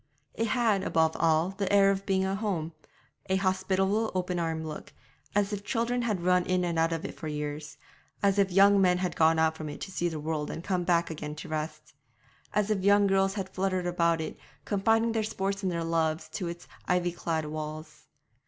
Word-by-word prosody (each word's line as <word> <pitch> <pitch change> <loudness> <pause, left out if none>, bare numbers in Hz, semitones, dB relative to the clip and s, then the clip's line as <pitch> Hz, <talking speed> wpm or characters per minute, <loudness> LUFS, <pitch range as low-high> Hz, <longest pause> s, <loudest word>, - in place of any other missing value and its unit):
It 230 - -1
had, 225 -5 +2
above 160 -3 +1
all, 160 +1 +3
the 195 0 -3
air 200 -1 +6
of 195 0 -3
being 190 -1 +2
a 190 - -1
home 190 -6 -2 0.6
a 190 - +3
hospitable 190 +3 +1
open 180 -1 -1
armed 160 -1 -2
look, 155 -1 -8 0.4
as 205 0 +1
if 200 -1 -4
children 240 +2 0
had 210 -7 -1
run 180 0 +3
in 185 -1 +1
and 170 -2 -1
out 165 +1 +2
of 165 -1 -3
it - - -5
for 155 - -7
years, 150 0 -5 0.5
as 200 0 +3
if 195 -1 +3
young 200 +2 +6
men 180 -1 +4
had 180 0 -2
gone 160 0 +4
out 160 0 +2
from 155 -1 -6
it 145 - -7
to 195 - -6
see 175 -2 -1
the 160 -2 -5
world 150 -1 -2
and 165 - -6
come 185 -2 0
back 170 -2 +2
again 150 -1 -6
to 155 - -8
rest, 155 -1 -5 0.6
as 210 0 +1
if 195 -3 0
young 200 +1 +5
girls 195 0 +2
had 195 -3 -3
fluttered 185 -1 -1
about 170 -2 +1
it, 155 - -6 0.3
confiding 225 +3 +2
their 225 -1 0
sports 200 -2 -2
and 190 -2 -1
their 170 -1 -2
loves 165 -1 0
to 180 - -4
its 170 +1 -7 0.2
ivy 180 -1 +1
clad 165 -2 -2
walls. 155 0 -7
180 Hz, 210 wpm, -28 LUFS, 160-195 Hz, 0.6 s, air